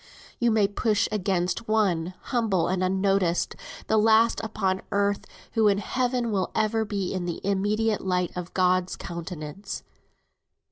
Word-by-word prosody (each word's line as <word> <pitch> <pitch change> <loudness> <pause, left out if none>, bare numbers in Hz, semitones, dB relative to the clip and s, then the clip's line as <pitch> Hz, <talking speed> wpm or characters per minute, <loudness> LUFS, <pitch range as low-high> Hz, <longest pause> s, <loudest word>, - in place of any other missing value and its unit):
You 240 - +3
may 215 -3 +3
push 210 +1 +1
against 195 +1 -1
one, 185 -5 +1 0.2
humble 220 -7 +2
and 185 0 0
unnoticed, 190 -2 +1 0.3
the 220 - +2
last 225 +1 +4
upon 195 -3 -1
earth, 200 0 0 0.2
who 225 -2 +3
in 200 -1 +4
Heaven 245 +2 -1
will 190 -3 +1
for - - +2
ever 220 +1 +1
be 200 -3 -2
in 185 -2 -2
the 170 -2 -3
immediate 205 +2 +1
light 180 -1 0
of 180 -1 -6
God's 185 0 +2
countenance. 170 0 -6
200 Hz, 145 wpm, -26 LUFS, 185-220 Hz, 0.3 s, last